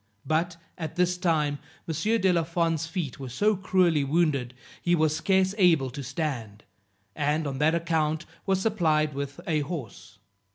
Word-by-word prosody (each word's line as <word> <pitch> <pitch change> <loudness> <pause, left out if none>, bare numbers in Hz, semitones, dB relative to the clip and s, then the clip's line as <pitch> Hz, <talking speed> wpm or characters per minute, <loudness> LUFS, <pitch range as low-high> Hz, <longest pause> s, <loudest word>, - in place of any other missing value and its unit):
But 170 +2 0 0.2
at 160 -3 -5
this 180 0 +2
time 155 -5 +1 0.3
M. 165 - -2 0.3
de 190 -1 +4
la 170 - +3
Fond's 165 -1 0
feet 165 -7 -4
were 135 -2 -6
so 205 - +2
cruelly 185 -5 +2
wounded, 140 -5 +1 0.3
he 175 0 +3
was 155 -2 +2
scarce 190 +1 +2
able 160 -8 +4
to 140 - -6
stand, 130 -6 -4 0.5
and 150 +2 0
on 135 -2 -3
that 155 +2 +3
account 160 -1 0 0.2
was 190 -1 +2
supplied 160 -8 +1
with 140 0 -5
a 155 -2 +1
horse. 145 - -6
160 Hz, 160 wpm, -27 LUFS, 145-175 Hz, 0.5 s, de